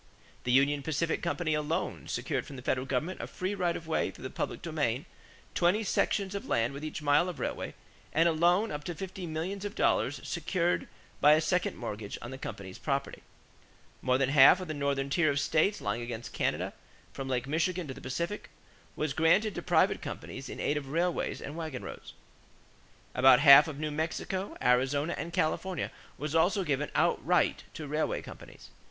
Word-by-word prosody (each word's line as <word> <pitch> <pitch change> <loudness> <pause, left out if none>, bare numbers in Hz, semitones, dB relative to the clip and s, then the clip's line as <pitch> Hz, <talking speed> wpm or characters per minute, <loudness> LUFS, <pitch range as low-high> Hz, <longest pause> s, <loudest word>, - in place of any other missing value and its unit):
The 125 - +1
Union 140 +3 +4
Pacific 160 +3 -1
Company 170 -2 -1
alone 150 +1 -2
secured - - -2
from 140 - -9
the 125 - -9
federal 130 0 0
government 150 +8 -2
a - - -5
free 185 +2 -3
right 180 -3 0
of 165 - -10
way 160 - 0
through - - -12
the - - -5
public - - -4
domain, - - -1 0.5
twenty 180 +6 +2
sections 200 -1 0
of 200 - -5
land 115 +3 +1
with 140 +2 -7
each 155 0 -5
mile 145 +5 +4
of 175 - -7
railway, - - -3 0.4
and 165 +2 +4
a - - +4
loan 175 +7 +3
up 150 0 -4
to 175 - -4
fifty 185 +1 -6
millions 170 +5 -3
of 205 +1 -5
dollars - - +1
secured 175 -2 -1 0.3
by 150 +1 +7
a 155 - +5
second 175 +3 0
mortgage 105 -3 -5
on 120 - -8
the 130 - -7
company's 100 -6 -7
property. 140 -1 -2 0.8
More 125 0 +2
than 135 -1 +1
half 140 +5 +8
of 185 - -6
the 155 - -3
northern 140 -1 -1
tier 155 0 +3
of 140 0 +1
states 160 +8 +2
lying 120 - -2
against 120 -1 -6
Canada - - -1 0.4
from 135 -1 -5
Lake 125 -1 0
Michigan 170 +3 0
to 135 - -5
the 140 - -12
Pacific 170 +10 -4 0.5
was 150 -2 -1
granted 190 +7 +3
to - - -4
private - - +2
companies - - -7
in - - -7
aid 150 - 0
of 140 -2 -5
railways 170 +4 -1
and 145 - -6
wagon 160 -6 -5
roads. - - -9 1.0
About 130 0 +7
half 145 +1 +9
of 155 -3 -6
New 155 0 -3
Mexico, 165 +5 -3
Arizona, 135 +6 +2
and 170 - -5
California 175 +1 -1 0.3
was 150 +1 -4
also 180 +4 +3
given 150 -2 -1
outright - - +2
to 155 - -6
railway 150 +2 -1
companies. - - -12
155 Hz, 190 wpm, -30 LUFS, 135-175 Hz, 1.0 s, half